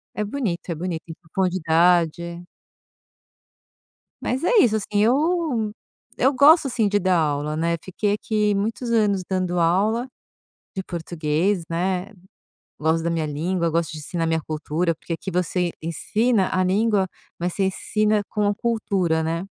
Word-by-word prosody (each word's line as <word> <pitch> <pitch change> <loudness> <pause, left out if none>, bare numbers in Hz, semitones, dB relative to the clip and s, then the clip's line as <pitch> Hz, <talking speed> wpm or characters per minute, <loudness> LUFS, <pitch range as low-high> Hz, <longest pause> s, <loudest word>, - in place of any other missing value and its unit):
É 210 - -1
bonito, 205 -6 -3
é 170 - -1
bonito, 170 0 -4
tem 160 - -9
profundidade. 170 -1 +1 1.8
Mas 260 +4 -2
é - - +2
isso, 230 - +4
assim, 215 - -2 0.2
eu 280 -3 +1 0.5
eu 265 +3 +4
gosto, 295 +4 +6
assim, 235 -4 +1
de 205 - +2
dar 185 -1 +2
aula 150 -1 -1
né, 170 +2 0
fiquei 200 +2 -1
aqui 210 -1 0
muitos 225 +4 -2
anos 210 -4 +2
dando 185 -2 0
aula 205 +9 +2 0.7
de 190 - -3
português, 170 +2 -1
né. 180 +2 -1 0.7
Gosto 160 +1 +1
da 170 - 0
minha 165 -2 -1
língua, 170 +4 -1
gosto 165 0 0
de 155 - -7
ensinar 165 +2 -3
minha 160 0 0
cultura, 160 +2 -2
porque 165 - -6
aqui 165 - -5
você 180 0 0
ensina 205 +6 0
a 185 - +2
língua, 200 +1 +2 0.3
mas 175 +1 -2
você 195 - 0
ensina 210 +2 0
com 210 -1 0
a 205 - +1
cultura, 195 -8 0
né. 165 +3 -2
185 Hz, 150 wpm, -23 LUFS, 165-210 Hz, 1.8 s, gosto